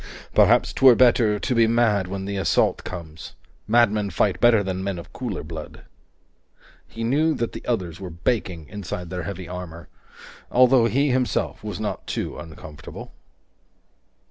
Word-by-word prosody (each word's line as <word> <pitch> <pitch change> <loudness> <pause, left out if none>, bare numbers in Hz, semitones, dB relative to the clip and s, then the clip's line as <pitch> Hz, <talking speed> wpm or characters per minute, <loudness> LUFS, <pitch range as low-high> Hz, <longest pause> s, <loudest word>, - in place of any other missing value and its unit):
"Perhaps - - +4
'twere 130 -2 +7
better 115 -4 +4
to 125 - -2
be 115 -1 +4
mad 110 -5 +2
when 95 +1 -5
the 100 0 -4
assault 95 -5 +1
comes. 80 -3 -8 0.3
Madmen 105 -2 +3
fight 95 +2 0
better 115 -3 +5
than 95 -1 -3
men 100 -2 -3
of 85 - -10
cooler 120 -7 -4
blood." 80 0 -9 1.0
He 115 - -7
knew 150 +7 +2
that 115 - -2
the - - -8
others 90 -8 -2
were 95 -2 -6
baking 85 - -2
inside 90 -3 -6
their 90 -1 -3
heavy 95 -3 -7
armor, 90 -2 -8 0.6
although 125 -1 +5
he 135 +5 +1
himself 125 -3 -1
was - - -5
not - - -4
too - - -3
uncomfortable. 80 -2 -10
100 Hz, 150 wpm, -23 LUFS, 90-120 Hz, 1.0 s, twere